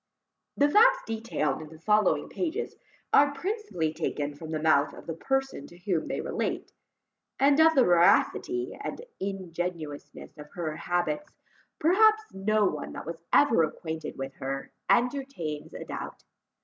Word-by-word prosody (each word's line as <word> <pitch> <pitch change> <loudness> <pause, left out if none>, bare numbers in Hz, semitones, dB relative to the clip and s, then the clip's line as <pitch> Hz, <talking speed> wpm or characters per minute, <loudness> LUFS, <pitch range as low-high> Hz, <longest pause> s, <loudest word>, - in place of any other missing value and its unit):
The 285 - +5
facts - - +5
detailed 225 -10 -2
in 155 - -9
the 160 - -13
following 210 +4 +2
pages, 365 +6 -3 0.4
are 285 0 +5
principally 370 - -2
taken 150 -2 -3
from 155 +2 -9
the 155 -1 -2
mouth 155 -2 +3
of - - -12
the 165 - -4
person 270 - -2
to 175 - -15
whom 175 -3 -1
they - - -2
relate; - - -3 0.7
and 280 +2 +4
of 320 0 +6
the 265 - +6
veracity 295 - +3
and - - -5 0.2
ingenuousness 175 -6 -5
of 150 0 -10
her 160 -3 -3
habits, 175 - -2 0.5
perhaps 435 +6 +4
no 210 +2 +2
one 150 -6 -3
that - - -7
was 165 +1 -6
ever 285 -11 +5
acquainted 160 0 -4
with 135 0 -5
her, 135 +1 -4 0.2
entertains 240 - 0
a - - -7
doubt. - - -7
185 Hz, 150 wpm, -28 LUFS, -, 0.7 s, of